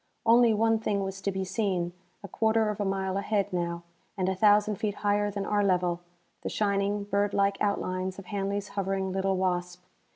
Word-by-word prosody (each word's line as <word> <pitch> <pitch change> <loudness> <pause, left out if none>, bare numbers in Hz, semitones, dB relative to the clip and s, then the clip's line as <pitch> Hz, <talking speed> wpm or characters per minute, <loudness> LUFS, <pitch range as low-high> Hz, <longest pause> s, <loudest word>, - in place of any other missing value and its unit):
Only 235 +1 +6
one 225 +1 +2
thing 205 -2 -1
was 195 0 -5
to 200 - -1
be 190 0 -2
seen: 185 -3 -1 0.3
a - - -6
quarter 220 +2 +1
of 210 - -5
a - - 0
mile 190 0 -1
ahead, 200 -1 -1
now, 170 -1 -2 0.3
and 185 -1 0
a 190 - +2
thousand 210 +1 +4
feet 210 0 -2
higher 205 0 +2
than 200 -1 -4
our 205 -1 +1
level, 180 -3 +1 0.4
the - - -3
shining, 200 0 0
bird 200 0 0
like 200 0 +1
outlines 185 -2 -1
of 195 - -9
Hanley's 200 +1 -3
hovering 195 -1 -2
little 190 0 0
Wasp. 180 -1 -1
200 Hz, 190 wpm, -28 LUFS, 190-205 Hz, 0.4 s, Only